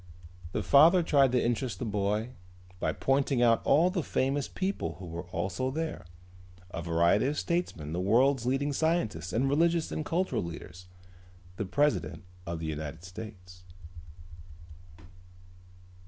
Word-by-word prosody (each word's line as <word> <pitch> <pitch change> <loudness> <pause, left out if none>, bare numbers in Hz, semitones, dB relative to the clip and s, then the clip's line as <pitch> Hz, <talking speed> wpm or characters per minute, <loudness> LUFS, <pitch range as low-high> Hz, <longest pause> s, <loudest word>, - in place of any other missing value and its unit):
The - - -1
father 165 +6 +6
tried 140 -5 +4
to 125 - +4
interest 120 -3 -1
the 125 - -4
boy 105 +2 -1 0.5
by - - 0
pointing 135 -2 +1
out 115 -1 +4
all 165 +6 +4
the 180 -2 -1
famous 135 -1 -1
people 185 - -3
who 90 +3 -10
were 85 +1 -7
also 95 +7 -2
there: 160 - -4 0.7
a 85 - -4
variety 85 +7 +2
of 145 +1 -2
statesmen 85 - -2
the 90 - -1
world's 125 +5 +3
leading 140 +3 0
scientists 120 - 0
and 125 +7 +1
religious 165 +3 +2
and 155 - -2
cultural 165 -7 -1
leaders, 85 +1 -8 0.7
the 100 - -2
president 95 - 0 0.2
of 85 0 -3
the 80 - -5
United 80 +1 -5
States. 90 -2 -10
120 Hz, 140 wpm, -29 LUFS, 90-145 Hz, 0.7 s, father